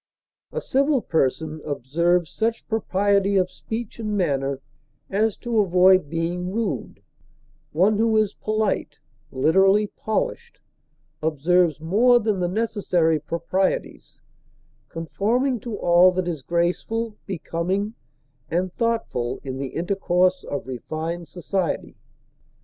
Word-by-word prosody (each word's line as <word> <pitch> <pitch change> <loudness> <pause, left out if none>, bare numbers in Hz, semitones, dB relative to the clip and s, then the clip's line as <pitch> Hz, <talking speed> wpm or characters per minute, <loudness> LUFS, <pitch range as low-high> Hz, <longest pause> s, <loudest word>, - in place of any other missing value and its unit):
A - - -3
civil 275 -2 +1
person 155 0 -1
observes 165 +5 0
such 225 +1 -2
propriety 200 -2 +1
of 185 -1 +1
speech 225 0 -6
and 215 -2 -2
manner 140 -6 0 0.5
as 210 +2 +1
to 235 -2 -1
avoid 185 -3 +5
being 175 +3 -2
rude; 200 - -3 0.7
one 200 +7 +3
who 225 -1 +3
is 215 -2 +2
polite 215 -8 -2 0.3
(literally 190 +9 +4
polished) 470 - -3 0.6
observes 160 +2 +2
more 225 +10 +4
than 215 -3 0
the 175 - +1
necessary 180 -6 +1
proprieties, 170 +5 -2 0.7
conforming 225 - 0
to 220 0 -5
all 175 +1 +5
that 185 -1 -1
is 160 -5 -3
graceful, 180 - -1
becoming, 190 +3 -2 0.6
and 180 +1 -1
thoughtful 180 - -1
in 130 -1 -5
the 135 -1 -5
intercourse 180 0 +1
of 140 - -3
refined 160 +6 -5
society. 180 0 -3
185 Hz, 110 wpm, -23 LUFS, 165-215 Hz, 0.7 s, avoid